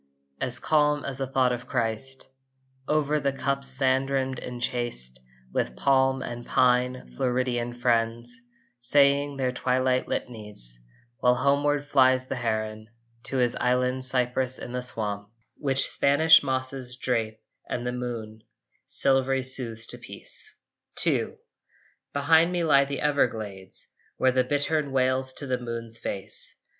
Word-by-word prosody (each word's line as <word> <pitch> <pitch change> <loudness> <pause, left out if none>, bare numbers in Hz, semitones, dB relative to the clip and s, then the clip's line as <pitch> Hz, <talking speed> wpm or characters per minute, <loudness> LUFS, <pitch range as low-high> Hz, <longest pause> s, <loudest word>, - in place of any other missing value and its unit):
As 125 -1 +1
calm 150 -1 +2
as 135 -1 -2
a 135 - -1
thought 130 -1 +2
of 125 0 -4
Christ 125 +2 -1 0.6
Over 150 0 +1
the 140 -1 0
cup's 140 0 -2
sand 135 0 +2
rim 135 -1 0
enchased 120 - -2 0.3
With 60 - -1
palm 135 -1 +2
and 120 0 -6
pine, 125 - +1
Floridian 125 - -1
friends, 120 0 0 0.4
Saying 140 +2 +3
their 130 -2 0
twilight 130 0 +1
litanies; 105 - -3 0.4
While 125 0 +4
homeward 145 +2 +1
flies 130 -2 +4
the 130 - -4
heron 110 -2 -2 0.4
To 135 - -3
his 125 -2 +2
island 125 +1 +1
cypress 130 0 +1
in 120 - -8
the 125 0 -2
swamp, 105 -4 -3 0.3
Which 135 -2 +3
Spanish 155 +3 +6
mosses 130 -2 -2
drape 115 -4 -1 0.3
and 120 - -3
the 125 - -1
moon 115 -3 -5 0.5
Silverly 135 -1 +2
soothes 120 -4 -1
to - - -4
peace. - - -3 0.6
II - - 0 0.8
Behind 160 +4 +4
me 175 -1 0
lie 140 -3 +5
the 140 0 -4
Everglades, 110 -10 -1 0.3
Where 130 - +3
the 130 0 +2
bittern 145 +2 0
wails 130 0 +1
to 145 - -7
the 130 -2 -1
moon's 115 -1 -3
face. 100 -3 -5
130 Hz, 135 wpm, -26 LUFS, 120-135 Hz, 0.8 s, Spanish